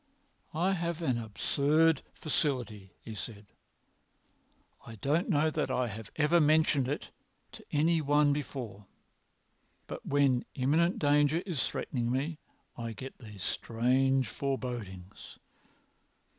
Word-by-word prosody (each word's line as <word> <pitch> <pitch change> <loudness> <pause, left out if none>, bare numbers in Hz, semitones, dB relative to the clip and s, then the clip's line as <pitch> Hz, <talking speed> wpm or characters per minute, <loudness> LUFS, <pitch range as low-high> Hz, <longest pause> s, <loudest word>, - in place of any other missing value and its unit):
"I 175 +4 +2
have 170 -2 -2
an 130 -6 +1
absurd 145 +8 +2
faculty," 125 - -1 0.2
said 105 -1 -7
he; - - -37 1.4
"I - - -9
don't 150 - 0
know 155 -2 +3
that - - -1
I 125 -2 0
have 110 +1 -8
ever 160 +3 +4
mentioned 150 -3 +3
it 145 - -4 0.4
to - - -11
any 160 +2 +3
one 145 0 +4
before. 125 -8 -5 1.0
But - - -7
when 140 -3 +2
imminent 155 +7 +2
danger 145 +3 +3
is 170 -9 0
threatening 120 -3 -2
me 145 +5 -1 0.4
I 115 -1 -5
get 130 +5 -8
these 105 -6 -9
strange 130 +2 +1
forebodings. 115 -9 -5
140 Hz, 115 wpm, -31 LUFS, 120-155 Hz, 1.4 s, ever